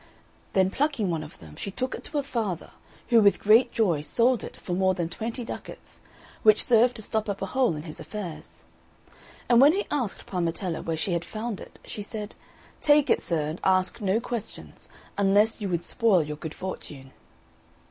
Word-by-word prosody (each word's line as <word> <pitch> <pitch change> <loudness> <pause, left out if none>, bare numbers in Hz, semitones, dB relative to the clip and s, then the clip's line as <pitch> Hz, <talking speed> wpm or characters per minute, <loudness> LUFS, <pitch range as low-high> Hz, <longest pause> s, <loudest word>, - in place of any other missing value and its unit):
Then 190 -1 +3
plucking 275 - 0
one 165 -2 -1
of 155 - -10
them, 75 -2 -13
she - - -5
took 255 +6 -3
it - - -7
to 300 - -4
her 285 - +1
father, 220 - -3 0.4
who 235 -2 +6
with 200 -1 +5
great 230 +4 +5
joy 180 -10 +1
sold 235 +9 +2
it - - -9
for 180 - -4
more 185 +1 +2
than 170 -2 -2
twenty 230 +6 -4
ducats, - - -9 0.4
which 215 -1 +5
served 240 +1 +4
to 220 - -4
stop 220 0 -1
up 200 - -2
a - - -2
hole 250 -5 +1
in 150 - -6
his 155 -2 -8
affairs. 175 +1 -8 0.8
And 240 0 +6
when 290 +3 +7
he 400 +3 -1
asked 255 -9 -2
Parmetella 175 -1 -2
where 165 -1 -2
she 175 +3 -1
had 170 0 -1
found 215 +2 -5
it, - - -12
she 210 - -6
said, 210 0 -6 0.5
"Take 295 -1 +4
it, - - +3
sir, 165 -3 -1
and 155 +3 -5
ask 185 +3 +2
no 200 +2 +2
questions, 235 -2 -7 0.3
unless 205 +3 +3
you 200 - -2
would 175 -1 -1
spoil 215 -8 +3
your 150 0 -6
good 160 0 -7
fortune." 145 -7 -7
200 Hz, 195 wpm, -26 LUFS, 170-235 Hz, 0.8 s, when